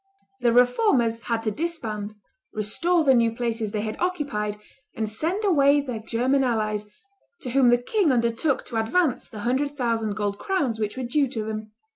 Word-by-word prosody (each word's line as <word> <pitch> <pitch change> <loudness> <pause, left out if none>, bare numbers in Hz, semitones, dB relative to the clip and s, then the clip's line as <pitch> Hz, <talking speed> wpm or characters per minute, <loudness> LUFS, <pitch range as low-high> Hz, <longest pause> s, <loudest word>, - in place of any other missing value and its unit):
The 240 -1 +3
Reformers 245 - +3
had 230 -1 -1
to 215 - 0
disband, 215 -8 -4 0.4
restore 325 - +1
the 270 -3 +5
new 230 -2 +3
places 230 -3 -2
they 210 -1 -2
had 215 0 -4
occupied, 280 - -1 0.4
and 220 - -2
send 330 - -2
away 290 -6 +4
their 255 -5 -4
German 250 +5 +1
allies, 215 -4 -1 0.5
to 250 - -5
whom 260 -1 +4
the 240 - +5
king 330 - +1
undertook 240 +4 +1
to 235 - -5
advance 270 +4 0
the 215 -3 -8
hundred 280 +5 -1
thousand 225 -4 -1
gold 205 -2 -2
crowns 275 - -1
which 210 +2 -2
were 260 - -3
due 275 +4 +1
to 230 -4 -4
them. 215 0 -6
240 Hz, 175 wpm, -25 LUFS, 220-280 Hz, 0.5 s, the